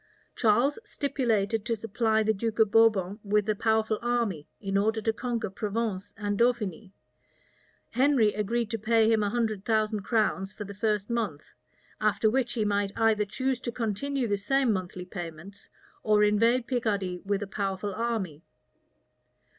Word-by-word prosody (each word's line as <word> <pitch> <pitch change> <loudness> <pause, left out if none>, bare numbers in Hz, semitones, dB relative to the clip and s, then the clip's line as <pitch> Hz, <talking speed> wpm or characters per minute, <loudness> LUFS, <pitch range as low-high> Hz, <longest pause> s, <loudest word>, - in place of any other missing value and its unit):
Charles 240 - +2
stipulated 230 - 0
to 230 - +1
supply 220 0 0
the 220 +1 +2
Duke 220 +2 -3
of 220 -3 +4
Bourbon 210 -3 +3
with 210 0 +1
a 215 - +2
powerful 220 0 +1
army, 235 -10 -1
in 195 -1 -3
order 220 +3 +2
to 220 +1 0
conquer 230 -3 -3
Provence 205 -1 -3
and 205 -1 -2
Dauphiny: 220 -5 0 1.0
Henry 250 -4 +3
agreed 220 +2 -1
to 225 - -2
pay 225 +1 +3
him 220 -1 +3
a 205 - +1
hundred 220 -3 -1
thousand 215 -1 +1
crowns 205 -2 0
for 210 - -6
the 200 0 -8
first 210 +1 -1
month; 205 -11 -3 0.5
after 215 0 +2
which 245 -1 0
he 220 -3 0
might 200 -1 0
either 220 -2 +3
choose 260 +5 -2
to 240 - -4
continue 245 +4 -2
the 205 -1 0
same 265 +2 +2
monthly 185 -1 -4
payments, 175 +1 -9 0.3
or 210 -1 +3
invade 230 +4 +3
Picardy 205 -8 -1
with 200 +1 -1
a - - -3
powerful 195 0 -3
army. 215 -9 -2
215 Hz, 155 wpm, -28 LUFS, 200-230 Hz, 1.0 s, of